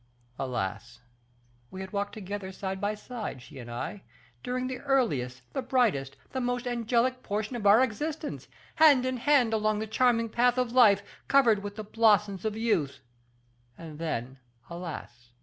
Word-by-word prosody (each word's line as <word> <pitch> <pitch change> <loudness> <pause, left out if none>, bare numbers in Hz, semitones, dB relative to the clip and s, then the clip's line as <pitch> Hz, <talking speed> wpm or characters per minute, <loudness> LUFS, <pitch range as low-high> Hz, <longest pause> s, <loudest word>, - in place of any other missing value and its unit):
Alas! 120 -2 -4 0.7
we 190 - -9
had 190 +2 -7
walked 200 0 -2
together 200 -2 -5
side 190 0 -5
by 205 +1 0
side, 220 - -6
she 125 +2 -12
and 120 -1 -9
I, 120 - -5 0.4
during 255 +1 -2
the 255 -1 -4
earliest, 145 - 0
the - - -1
brightest, 225 - +1
the 260 - -2
most 245 0 -1
angelic 245 +1 0
portion 215 +3 -3
of 215 -4 0
our 215 +5 +7
existence, 295 +6 -4 0.3
hand 290 -5 +6
in 255 0 -1
hand 250 -3 +3
along 215 -1 +1
the 215 - -2
charming 230 +1 +2
path 245 +2 +2
of 250 -2 0
life, 210 -6 +6 0.2
covered 235 -7 +4
with 205 0 -6
the 215 - -5
blossoms 210 -3 +2
of 215 0 -1
youth; 205 -12 0 0.8
and 160 -2 -10
then, 130 -5 -4 0.3
alas! 155 -9 -8
215 Hz, 160 wpm, -28 LUFS, 185-245 Hz, 0.8 s, our